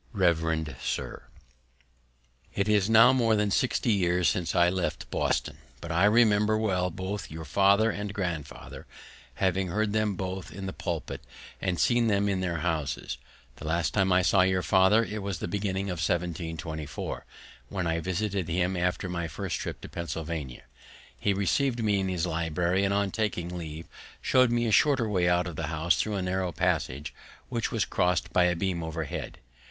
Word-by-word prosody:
Revd 80 -4 +1
Sir, - - -4 1.3
It 100 - 0
is 105 -1 +3
now 115 +3 +7
more 115 -4 +3
than 105 -1 +1
60 125 0 +1
years 90 -3 +2
since 85 -3 -1
I 85 - +5
left 90 0 -2
Boston, - - -1 0.2
but 85 +1 -6
I 85 +4 +3
remember 105 -1 +4
well 95 -4 0
both 95 +2 -5
your 80 +1 -7
father 100 +5 +4
and 105 0 -4
grandfather, 85 -8 -5 0.5
having 95 0 +1
heard 105 +4 0
them 110 -2 +1
both 95 0 -5
in 95 +1 -7
the 95 - -4
pulpit, 85 -4 -4 0.4
and 90 -3 -1
seen 120 -1 +3
them 100 -1 +2
in 100 -2 0
their 85 -3 -2
houses. 75 -6 -2 0.4
The - - -7
last 85 +1 0
time 95 -2 +2
I 90 0 +4
saw 95 +1 +4
your 95 0 +2
father 100 +4 +4 0.2
was 100 -3 -3
in - - -13
the - - -2
beginning 100 0 -2
of 90 - -4
1724, 80 -2 -3 0.5
when 95 -3 -2
I 80 0 0
visited 95 +1 -2
him 90 +2 0
after 90 +2 -1
my 85 -2 -3
first 85 -2 -4
trip - - -5
to - - -8
Pennsylvania. 80 -6 -5 0.6
He 100 - +1
received 115 +5 +1
me 105 -2 +2
in 95 - -1
his 90 -3 -1
library, 85 +3 0
and 100 - +1
on 100 0 +2
my 95 - -5
taking 90 -5 -2
leave 80 -1 -6 0.3
showed 130 -1 +4
me 120 0 +1
a 110 - 0
shorter 130 +1 +4
way 90 -4 +2
out 90 0 +2
of 85 -3 -6
the 80 +1 -3
house 80 +2 +1
through 105 -1 -2
a 95 - -1
narrow 90 0 -1
passage, 70 -2 -1 0.4
which 120 -2 -2
was 110 -3 +1
crossed 90 0 0
by 90 - +5
a 90 -1 +2
beam 90 -1 -1
overhead. 80 -2 -5
95 Hz, 180 wpm, -28 LUFS, 85-100 Hz, 1.3 s, now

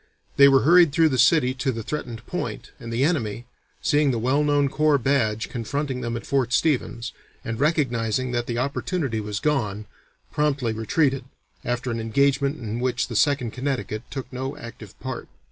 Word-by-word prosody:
They 140 - +8
were 135 -1 +5
hurried 170 0 +6
through 160 +2 +4
the 130 -3 -1
city 130 0 +4
to 130 +1 -1
the 115 -2 -5
threatened 120 -4 -5
point, 180 - -5
and 115 -3 -7
the 120 +3 +1
enemy, 120 -8 -1 0.4
seeing 145 -1 +3
the 125 - 0
well 130 +6 +1
known 145 -1 +3
corps 155 +1 +2
badge 115 -5 +1
confronting 130 +2 -3
them 120 -1 -2
at - - -8
Fort 130 -3 0
Stevens, 125 -5 0 0.3
and 115 -2 -4
recognizing 130 -5 +1
that 120 -1 -1
the 120 - -2
opportunity 140 -1 -1
was 105 -1 -4
gone, 110 -9 -1 0.5
promptly 140 -6 0
retreated, 135 +4 0 0.4
after 120 +1 -2
an 115 - -2
engagement 140 +5 +1
in 115 0 -4
which 125 +1 -1
the 115 - -5
Second 135 -2 +2
Connecticut 130 -5 -3
took 135 -2 -5
no 130 +3 -4
active 115 -5 -11
part. 130 -1 -6
130 Hz, 175 wpm, -24 LUFS, 115-145 Hz, 0.5 s, They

